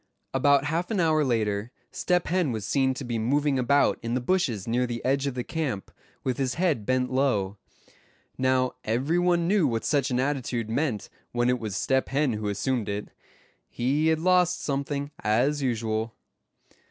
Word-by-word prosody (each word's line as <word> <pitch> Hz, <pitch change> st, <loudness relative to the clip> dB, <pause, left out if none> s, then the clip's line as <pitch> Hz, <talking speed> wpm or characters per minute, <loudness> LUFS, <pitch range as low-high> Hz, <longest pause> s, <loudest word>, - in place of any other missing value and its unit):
About 140 Hz, +1 st, +4 dB
half 165 Hz, +4 st, -1 dB
an 215 Hz, -4 st, 0 dB
hour 155 Hz, -2 st, +3 dB
later 110 Hz, -3 st, 0 dB, 0.2 s
Step 180 Hz, -1 st, 0 dB
Hen 175 Hz, -5 st, +1 dB
was 110 Hz, -3 st, -4 dB
seen 130 Hz, -2 st, +1 dB
to 135 Hz, -, -5 dB
be 120 Hz, -2 st, -2 dB
moving 140 Hz, +4 st, +1 dB
about 140 Hz, +3 st, +3 dB
in 115 Hz, +1 st, -2 dB
the -, -, +1 dB
bushes 125 Hz, -, 0 dB
near 125 Hz, +2 st, +1 dB
the 120 Hz, -1 st, -5 dB
edge 135 Hz, +2 st, +1 dB
of 135 Hz, -, -3 dB
the 125 Hz, -, -2 dB
camp, 135 Hz, -, -3 dB, 0.3 s
with 130 Hz, -2 st, -1 dB
his 130 Hz, -2 st, 0 dB
head 160 Hz, -, 0 dB
bent 130 Hz, 0 st, +1 dB
low. 110 Hz, -7 st, +1 dB, 0.8 s
Now, 130 Hz, -1 st, +2 dB
every 130 Hz, +10 st, +1 dB
one 175 Hz, -1 st, +2 dB
knew 190 Hz, -5 st, +3 dB
what 115 Hz, -3 st, -2 dB
such 140 Hz, -4 st, +1 dB
an 125 Hz, -1 st, 0 dB
attitude 125 Hz, -5 st, -1 dB
meant 125 Hz, -4 st, -1 dB, 0.3 s
when 120 Hz, 0 st, +2 dB
it 125 Hz, -, 0 dB
was 110 Hz, -4 st, -4 dB
Step 130 Hz, 0 st, +1 dB
Hen 140 Hz, -2 st, +1 dB
who 105 Hz, -1 st, -3 dB
assumed 105 Hz, +2 st, -1 dB
it. 100 Hz, +1 st, -4 dB, 0.6 s
He 140 Hz, +6 st, 0 dB
had 160 Hz, 0 st, +3 dB
lost 180 Hz, +1 st, +3 dB
something, 140 Hz, 0 st, -2 dB
as 130 Hz, +8 st, +1 dB
usual. 110 Hz, -3 st, -1 dB
130 Hz, 175 wpm, -26 LUFS, 115-150 Hz, 0.8 s, About